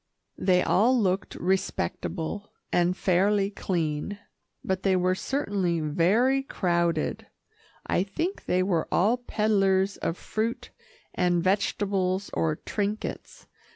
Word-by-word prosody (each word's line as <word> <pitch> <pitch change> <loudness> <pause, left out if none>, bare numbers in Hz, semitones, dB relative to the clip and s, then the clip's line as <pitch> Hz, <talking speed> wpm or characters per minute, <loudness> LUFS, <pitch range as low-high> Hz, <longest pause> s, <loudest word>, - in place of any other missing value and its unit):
They 180 -1 +3
all 245 +5 +3
looked 190 -2 0
respectable 190 0 -2 0.2
and 175 +1 +2
fairly 195 +2 +2
clean, 170 0 -2 0.5
but 190 0 -1
they 195 -1 +2
were 185 0 +2
certainly 195 - -1
very 195 - +2
crowded. 170 -9 -1 0.6
I - - +1
think 325 - -3
they 185 +1 +2
were 175 -4 0
all 215 +7 +3
peddlers 200 -4 +1
of 165 - -2
fruit 235 +3 -3 0.4
and 175 -1 +1
vegetables 195 0 0
or 160 -2 +1
trinkets. 210 +5 -4
190 Hz, 110 wpm, -27 LUFS, 180-210 Hz, 0.6 s, They